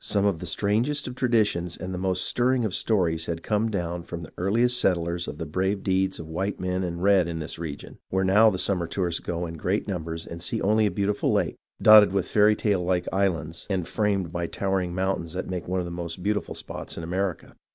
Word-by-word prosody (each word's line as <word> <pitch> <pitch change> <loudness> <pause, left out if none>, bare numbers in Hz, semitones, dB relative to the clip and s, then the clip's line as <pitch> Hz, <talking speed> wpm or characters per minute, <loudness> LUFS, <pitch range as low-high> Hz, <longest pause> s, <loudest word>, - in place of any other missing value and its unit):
Some 100 -1 +1
of 100 -5 +1
the 90 - -6
strangest 115 - 0
of 125 - -5
traditions 110 -9 +1
and 95 0 -5
the 90 - -3
most 95 -1 0
stirring 125 0 +1
of 100 - -2
stories 85 -7 +1
had 85 0 -4
come 110 +1 +1
down 90 -4 -2
from 85 0 -7
the - - -10
earliest 120 +7 +2
settlers 85 -1 0
of 75 - -6
the 80 - -4
brave 95 +5 -1
deeds 95 0 +1
of 80 - -7
white 95 +5 -3
men 90 0 -1
and 85 0 -4
red 95 -3 +4
in 85 -1 -4
this 80 0 -5
region, 80 -4 -7
where 95 0 +1
now 105 +4 +6
the 95 - -2
summer 90 -2 0
tourists 85 -2 -1
go 85 0 -3
in 85 -1 -7
great 95 +8 -1
numbers 80 -4 -4
and 85 0 -8
see 85 - -1
only 110 +2 +3
a - - +1
beautiful 100 +2 0
lake, - - 0 0.2
dotted 105 -3 +8
with 95 -2 0
fairy 105 0 +4
like 90 -4 0
islands 85 -5 -1
and 90 -4 -1
framed 100 -5 0
by 85 0 -2
towering 95 -2 -1
mountains 95 -3 -1
that 90 - -4
make 90 -2 -4
one 95 +1 -1
of 90 - -1
the 85 - -6
most 85 0 -5
beautiful 105 +1 -1
spots - - -7
in 85 - -5
America. 90 +2 -3
95 Hz, 225 wpm, -26 LUFS, 85-100 Hz, 0.2 s, dotted